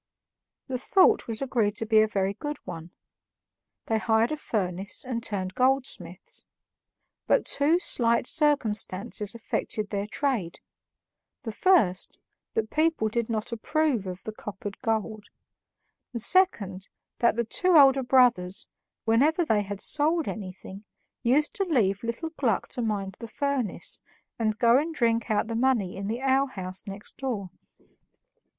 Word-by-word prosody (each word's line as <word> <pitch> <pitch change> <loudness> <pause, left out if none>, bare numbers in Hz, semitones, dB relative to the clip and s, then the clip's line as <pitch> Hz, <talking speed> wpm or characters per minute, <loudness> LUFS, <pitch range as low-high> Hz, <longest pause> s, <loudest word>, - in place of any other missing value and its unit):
The 255 -2 -4
thought 390 - +4
was 225 +2 -3
agreed 225 -6 0
to 225 - -2
be 215 0 +5
a 215 - +3
very 195 -2 -1
good 295 +6 -5
one; 165 +1 -7 1.0
they 220 -1 0
hired 225 +2 +2
a - - 0
furnace 195 - -2
and 245 -2 -3
turned 190 -4 -2
goldsmiths. 270 - -1 0.8
But - - +3
two 305 +5 +3
slight 235 -9 +2
circumstances 215 - 0
affected 215 -2 -2
their 200 0 -2
trade: 220 - -2 0.8
the 225 - -4
first, 210 - +2 0.4
that 220 -1 -1
people 310 -8 +1
did 235 +1 -2
not 220 0 -3
approve 245 -2 0
of 180 0 -7
the 220 - -5
coppered 205 -1 -8
gold; 220 -1 -2 0.9
the 235 - -3
second, 210 - +1 0.3
that 235 - +3
the 235 0 0
two 360 +9 +3
elder 270 -2 +7
brothers, 245 -8 +3 0.4
whenever 290 +10 +3
they 215 -7 +2
had 200 -1 -6
sold 310 +5 +1
anything, 195 -1 -7 0.4
used 280 +5 +2
to 395 - +1
leave 215 - +1
little 235 +8 -4
Gluck 230 -8 +1
to 250 - -3
mind 200 -4 -2
the 230 - -7
furnace, 280 -3 -2 0.4
and 215 -1 0
go 235 +2 +5
and 320 +2 -3
drink 230 -3 +1
out 215 0 +1
the 230 0 -4
money 230 -6 +1
in 195 +1 -5
the 230 +4 -3
alehouse 260 -10 0
next 200 +1 -9
door. 220 -9 -4
230 Hz, 145 wpm, -27 LUFS, 205-270 Hz, 1.0 s, elder